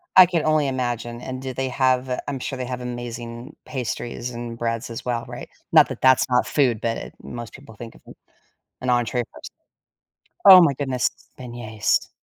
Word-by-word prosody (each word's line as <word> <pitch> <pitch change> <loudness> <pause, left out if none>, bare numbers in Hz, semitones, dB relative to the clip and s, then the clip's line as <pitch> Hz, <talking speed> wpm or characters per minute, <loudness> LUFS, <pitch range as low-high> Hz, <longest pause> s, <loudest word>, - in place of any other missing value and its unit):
I 185 - +11
can 170 -3 -1
only 155 -2 +3
imagine. 120 -2 -3
And 130 0 -6
do 130 -1 -5
they 130 +1 -2
have 130 0 +1
I'm 140 -2 -3
sure 135 - -4
they 125 - -3
have 125 0 -5
amazing 120 +1 -7
pastries 120 -1 -4
and 120 -1 -6
breads 115 -1 -2
as 115 - -6
well, 120 -2 -2
right? - - -8 0.2
Not - - +6
that - - -7
that's 130 0 +4
not 125 0 +3
food, 125 -7 +2
but 115 0 -3
most 120 -2 -8
people 135 -5 -13
think 115 +2 -10
of - - -18
a - - -11 0.7
an 130 - -2
entrée 120 0 +1
first. - - -10 0.9
Oh 185 -2 +11
my 145 -5 +3
goodness, 130 -3 0 0.3
beignets. 120 -4 -1
125 Hz, 180 wpm, -23 LUFS, 120-130 Hz, 0.9 s, I